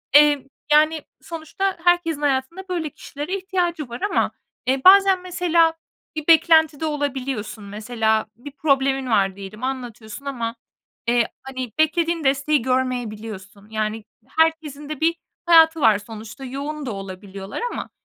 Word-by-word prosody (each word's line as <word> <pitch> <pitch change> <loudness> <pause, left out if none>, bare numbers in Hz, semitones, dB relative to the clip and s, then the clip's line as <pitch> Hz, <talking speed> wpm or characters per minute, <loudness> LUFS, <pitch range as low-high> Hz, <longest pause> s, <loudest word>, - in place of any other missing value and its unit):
eee, 290 -2 +6 0.2
yani, 310 +1 +4 0.2
sonuçta 340 +4 -3
herkesin 350 -4 +2
hayatında 290 +7 -1
böyle 340 -4 -2
kişilere 295 +7 -5
ihtiyacı 350 -6 -2
var 240 +1 -7
ama, 410 - +1 0.4
eee, 260 +1 +2
bazen 385 -1 +7
mesela 340 -2 +2 0.4
bir 310 -1 -5
beklentide 320 -2 +5
olabiliyorsun. 270 -8 -3
Mesela 220 +1 0
bir 265 +5 -10
problemin 270 -2 +1
var 195 -4 +2
diyelim 200 +4 -9
anlatıyorsun 245 -1 -5
ama, 235 -4 -3 0.5
eee, 235 -1 +3 0.2
hani, 260 -3 -5
beklediğin 330 +1 +2
desteği 280 +2 +2
görmeyebiliyorsun. 225 -5 -3
Yani, 215 0 -2 0.2
herkesin 315 -3 0
de 305 -2 -5
bir 330 +1 +3 0.3
hayatı 325 -2 +6
var 215 -4 +5
sonuçta 220 +5 -9
yoğun 285 +3 -5
da 245 - -3
olabiliyorlar 195 0 -7
ama - - -5
275 Hz, 130 wpm, -22 LUFS, 230-320 Hz, 0.5 s, bazen